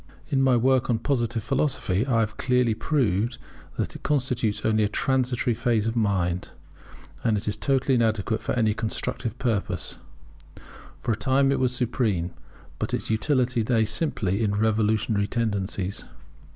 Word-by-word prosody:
In 135 -3 +2
my 130 -2 +4
work 130 +1 +2
on 120 - +3
Positive 120 -2 -1
Philosophy 135 -6 0
I 115 -4 +3
have 105 -1 -2
clearly 125 -3 +2
proved 115 - 0 0.4
that - - -2
it - - -9
constitutes 120 -7 0
only 110 -1 +3
a - - +3
transitory 125 0 +1
phase 115 -2 +1
of 115 +1 -1
mind, 95 -5 0 0.7
and 110 -3 +2
is 105 +1 -2
totally 135 -1 +1
inadequate 110 -2 +1
for - - -2
any 110 -3 +2
constructive 115 +1 -3
purpose. 115 -6 -2 1.0
For - - -2
a - - +1
time 135 +4 +2
it 140 - +1
was 125 -1 +1
supreme; 110 -8 0 0.5
but - - -1
its - - -3
utility 125 +1 +1
lay 110 0 +2
simply 110 - -1
in 100 -2 +1
its 105 - -1
revolutionary 110 -1 +1
tendencies. 100 -4 -2
115 Hz, 150 wpm, -25 LUFS, 105-125 Hz, 1.0 s, my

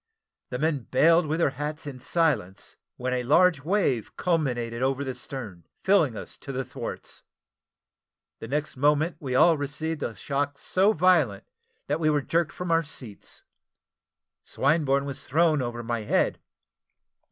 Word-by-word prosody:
The 125 - -3
men 150 -3 -1
baled 165 +5 +4
with 155 +2 0
their 155 - +3
hats 150 +1 -4
in 135 -3 -7
silence, 130 - -1 0.2
when 125 0 -2
a 125 - 0
large 155 +4 +4
wave 160 - 0
culminated 125 -9 -1
over 135 +1 0
the 130 -2 -3
stern, 105 - -7 0.2
filling 165 - +3
us - - -8
up - - -36
to 135 -2 -6
our 135 - -1
thwarts. - - -7 1.2
The - - -7
next 150 +4 -2
moment 150 +5 +2
we 130 -3 -3
all 165 +3 +5
received 150 +2 -3
a 115 - -3
shock 140 +5 -2
so 190 +7 +2
violent, 160 - +3 0.4
that 145 +3 -1
we 155 -1 +2
were 145 -2 +1
jerked 170 +2 0
from 180 -1 -4
our 165 0 +4
seats. 130 -9 -10 1.0
Swinburne 140 -1 +1
was 140 -1 -6
thrown 155 0 +3
over 120 -1 -4
my 115 0 -2
head. 105 - 0
145 Hz, 155 wpm, -26 LUFS, 125-160 Hz, 1.2 s, all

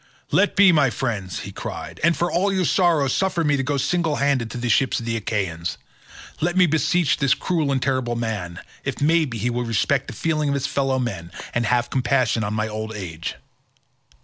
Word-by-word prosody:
"Let 205 - +3
be, 200 -2 +7
my 150 -5 +4
friends," 110 -8 -3
he - - -7
cried, - - -7
"and 170 +1 +3
for 175 - 0
all 195 +4 +1
your 190 -2 +1
sorrow, 165 -5 +3
suffer 180 +5 0
me 145 -2 +2
to 135 - 0
go 140 +2 -1
single 155 +3 0
handed 140 -5 +1
to - - -6
the 120 0 -2
ships 130 +2 +2
of 115 - -7
the 115 0 -1
Achaeans. 95 -5 -2 0.6
Let 175 +3 0
me 185 - +7
beseech 160 -1 +2
this 140 -3 +3
cruel 160 -6 -1
and 135 - +1
terrible 130 -2 -1
man, 105 -7 -3 0.2
if - - -3
maybe 150 -5 +2
he 120 +3 -1
will 120 +1 -1
respect 115 -4 0
the - - -6
feeling 155 -2 -1
of 140 - +1
his 140 -1 -1
fellow 135 -2 0
men, 100 -10 -4 0.2
and 120 -2 0
have 120 0 +1
compassion 125 -3 +1
on 105 +1 -2
my 110 0 0
old 110 0 -5
age. 85 -5 -5
130 Hz, 205 wpm, -22 LUFS, 115-155 Hz, 0.6 s, be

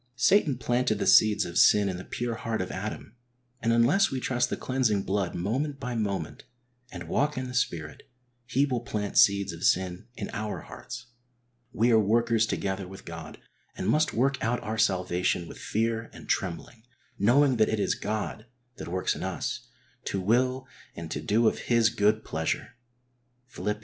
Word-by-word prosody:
Satan 145 - +3
planted 120 -2 0
the - - -2
seeds 110 -1 +5
of 85 0 -1
sin 105 -1 +6
in 95 -2 -2
the 90 - -7
pure 120 +3 -3
heart 115 -1 -3
of 90 - -3
Adam, 105 +2 -6 0.5
and 115 - +1
unless 125 +13 +4
we 135 - -3
trust 125 -1 0
the - - -2
cleansing 120 -7 0
blood 95 -2 -1
moment 135 - -2
by 125 -2 -4
moment, 95 -10 -3 0.5
and 85 -2 -8
walk 145 - 0
in 130 0 -3
the 125 - -7
Spirit, 80 - -3 0.4
he 130 +2 +2
will 130 -4 -1
plant 105 -3 -4
seeds 100 -2 +4
of 85 +1 -9
sin 90 +1 +1
in - - -5
our 105 0 -4
hearts. 120 -1 -9 0.7
We 115 +2 +2
arc 110 -1 +5
workers 115 +1 +2
together 95 -2 -2
with 95 +1 -11
God 85 -2 -8 0.4
and - - -3
must 155 +1 +3
work 135 +4 0
out 120 +2 +1
our 110 0 -3
salvation 90 -3 +1
with - - -10
fear 115 +1 -1
and - - -12
trembling, 95 +5 -3 0.4
knowing 130 +5 +4
that 110 - +3
it 110 - -1
is - - +1
God 110 +1 -4 0.3
that - - -7
works 90 +2 0
in - - -7
us, - - -4 0.4
to 100 - -2
will 125 +6 +1 0.3
and 80 -1 -7
to 75 - -3
do 110 +8 +2
of - - +1
His 115 -1 +4
good 110 -1 +1
pleasure 80 +9 -2 0.8
\Phil. - - -7
ii. 105 - +1
110 Hz, 180 wpm, -27 LUFS, 95-125 Hz, 0.8 s, sin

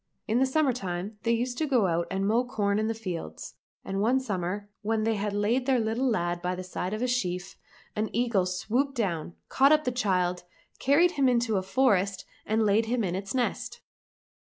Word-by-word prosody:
In 225 +3 +2
the 265 - +3
summer 275 -1 +2
time 195 -1 -5
they 230 - +1
used 245 +1 -1
to 315 - 0
go 250 -7 +3
out 170 -1 0
and 195 +1 -1
mow 225 +4 +3
corn 205 -4 0
in 215 - 0
the 225 - -1
fields, 180 - -6 0.3
and 195 +1 -2
one 245 +5 +3
summer 200 -4 -3
when 220 0 0
they 225 +1 +2
had 205 0 -2
laid 220 +6 0
their 265 -2 +4
little 230 +4 0
lad 175 -5 -1
by 180 +1 -1
the 185 - -6
side 180 0 -4
of 220 - -3
a - - +1
sheaf, 180 -8 -2 0.4
an 215 +1 -1
eagle 230 -6 +1
swooped 245 +10 -1
down, 175 - -2
caught 275 +2 +4
up 305 0 +5
the 250 - 0
child, 180 -7 0 0.4
carried 315 +6 +4
him 275 -6 +2
into 235 -3 +1
a - - +1
forest, 195 -3 +1 0.2
and 220 +1 +2
laid 215 +2 +3
him 240 0 0
in 180 -3 -1
its 195 +4 -4
nest. 250 -2 -2
215 Hz, 205 wpm, -28 LUFS, 190-250 Hz, 0.4 s, up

